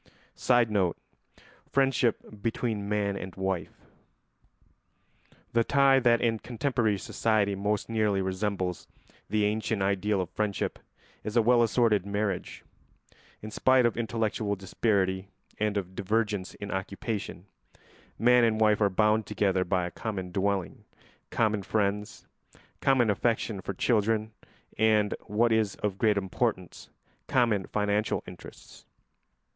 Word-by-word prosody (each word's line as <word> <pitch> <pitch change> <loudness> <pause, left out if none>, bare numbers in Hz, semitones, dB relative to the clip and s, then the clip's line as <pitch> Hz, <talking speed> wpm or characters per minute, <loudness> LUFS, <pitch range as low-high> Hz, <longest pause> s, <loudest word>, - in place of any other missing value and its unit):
[Sidenote: 110 -8 +2 0.7
Friendship 125 -6 0
between 110 -2 -2
man 100 -1 0
and 95 -1 -7
wife.] 95 -3 -4 1.7
The 115 0 +3
tie 135 +1 +4
that 120 -2 +4
in 115 -2 +1
contemporary 120 -4 -1
society 105 0 0
most 105 +1 -1
nearly 110 -3 +1
resembles 95 -1 -2 0.4
the 105 +1 +1
ancient 105 -1 -1
ideal 100 +1 +1
of 90 -1 -3
friendship 100 -1 -2 0.4
is 110 +2 -2
a - - +6
well 120 +1 +4
assorted 115 -4 +3
marriage. 100 -2 -3 0.8
In 110 - -7
spite 130 +2 +3
of 120 - +1
intellectual 110 -2 -1
disparity 95 -1 0 0.3
and 105 -1 0
of 95 -2 -4
divergence 105 0 -1
in 100 - -7
occupation, 100 0 -4 0.7
man 125 +1 +5
and 110 -1 +2
wife 110 -1 +3
are 100 - +4
bound 105 +2 +2
together 95 -2 +1
by 90 0 0
a 85 - -5
common 95 -2 -5
dwelling, 95 -1 -2 0.5
common 110 -2 +1
friends, 105 +1 -2 0.5
common 125 -5 +3
affection 110 -1 -1
for 100 - -5
children, 110 0 +1 0.5
and, 110 -2 +3
what 115 +3 +2
is 110 -3 +1
of 100 -2 -3
great 110 -3 +3
importance, 95 -1 -2 0.4
common 115 -7 +2
financial 105 0 0
interests. - - -13
105 Hz, 120 wpm, -28 LUFS, 100-115 Hz, 1.7 s, a